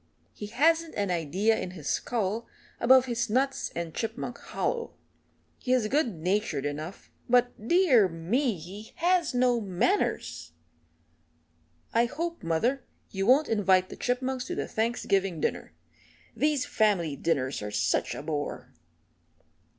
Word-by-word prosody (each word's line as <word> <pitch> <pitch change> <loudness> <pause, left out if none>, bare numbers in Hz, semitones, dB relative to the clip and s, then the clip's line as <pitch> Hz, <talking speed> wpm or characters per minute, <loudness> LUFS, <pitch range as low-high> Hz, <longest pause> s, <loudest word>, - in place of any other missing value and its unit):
He 210 - -7
hasn't 320 +8 +2
an 200 -2 -1
idea 180 +7 +1
in 180 - -4
his 150 -3 -8
skull 225 -1 -1 0.3
above 260 +1 +6
his 240 -1 -1
nuts 270 +4 0
and 170 -1 -4
Chipmunk 230 +2 -4
Hollow. 470 -1 -3 0.6
He 255 - 0
is 245 -4 +2
good 260 - +1
natured 175 -3 -1
enough, 155 +6 -6 0.2
but, 245 -2 +2
dear 275 - +5
me, 200 - 0
he 190 +7 -10
has 345 -4 +1
no 245 -1 +3
manners! 180 - -1 1.4
I 235 - +4
hope, 335 +7 -4
mother, 230 +11 0 0.3
you 195 0 -2
won't 275 +5 +5
invite 190 -4 +3
the - - -8
Chipmunks 255 +1 -2
to - - -4
the - - -3
Thanksgiving 195 -6 0
dinner - - -2 0.6
these 300 -3 +1
family 190 -9 +1
dinners 130 -5 -1
are 105 - -4
such 105 -4 0
a - - -6
bore." 150 -2 -4
220 Hz, 135 wpm, -28 LUFS, 175-255 Hz, 1.4 s, above